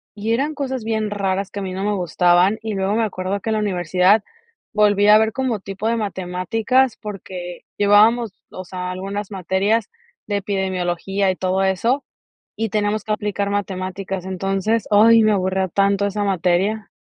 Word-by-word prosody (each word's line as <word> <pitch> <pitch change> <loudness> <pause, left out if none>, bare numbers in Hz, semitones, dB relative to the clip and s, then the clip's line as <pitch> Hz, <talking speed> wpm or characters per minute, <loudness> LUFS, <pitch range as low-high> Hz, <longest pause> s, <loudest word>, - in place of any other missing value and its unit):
y 220 +2 -1
eran 285 +6 0
cosas 265 -4 -3
bien 220 -1 -1
raras 195 -1 -1
que 200 - -5
a - - -4
mí 185 -1 -4
no 190 +1 -4
me 210 0 0
gustaban 180 +2 +3
y 220 -1 -4
luego 195 +1 -1
me 230 - +2
acuerdo 195 -1 -2
que 220 - -3
la 215 - +1
universidad 185 +1 +2 0.5
volvía 210 0 +4
a - - +8
ver 220 0 +2
como 255 -5 -1
tipo 195 +3 -5
de 230 - +1
matemáticas 215 +6 0
porque 185 -4 -8
llevábamos, 210 +2 +4 0.2
o 185 - -7
sea, 180 0 -5
algunas 195 +2 -5
materias 195 +4 0 0.4
de 205 -1 0
epidemiología 190 -1 -1
y - - -4
todo 185 +1 0
eso 230 +9 +1 0.5
y 225 +1 -1
tenemos 210 0 -1
que 215 - -2
aplicar 205 -1 -2
matemáticas. 190 -1 -4
Entonces, 195 +4 -1
ay, 225 +2 +6
me 215 0 +4
aburría 190 -1 0
tanto 200 +1 +1
esa 205 +1 -2
materia. 195 +3 0
200 Hz, 170 wpm, -20 LUFS, 190-215 Hz, 0.5 s, a